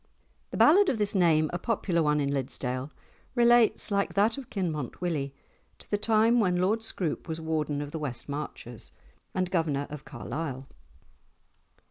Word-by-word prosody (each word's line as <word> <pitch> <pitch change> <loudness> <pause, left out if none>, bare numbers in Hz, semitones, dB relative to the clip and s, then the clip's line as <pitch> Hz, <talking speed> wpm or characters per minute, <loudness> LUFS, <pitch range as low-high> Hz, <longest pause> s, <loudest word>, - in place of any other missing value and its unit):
'" - - -40
The - - -5
ballad 375 +5 +6
of 250 - 0
this 210 -1 +1
name, 165 -5 +4
a 175 - -1
popular 190 -5 0
one 150 -1 +2
in 140 -1 0
Liddesdale, 130 0 -3 0.5
relates, 240 -2 +4
like 200 0 0
that 205 +3 +3
of 275 -3 -9
Kinmont 160 - -3
Willie, 155 -6 -2 0.5
to - - -15
the - - +3
time 225 +2 +4
when 180 -5 +2
Lord 205 +5 +2
Scroope 185 -7 -3
was 160 -1 -3
Warden 155 -2 -1
of 145 - -8
the 160 - -4
West 135 -6 -4
Marches 140 -5 -6 0.4
and 185 -1 0
Governor 155 -6 0
of 150 -1 -7
Carlisle. 135 +1 -5
165 Hz, 165 wpm, -28 LUFS, 145-205 Hz, 0.5 s, ballad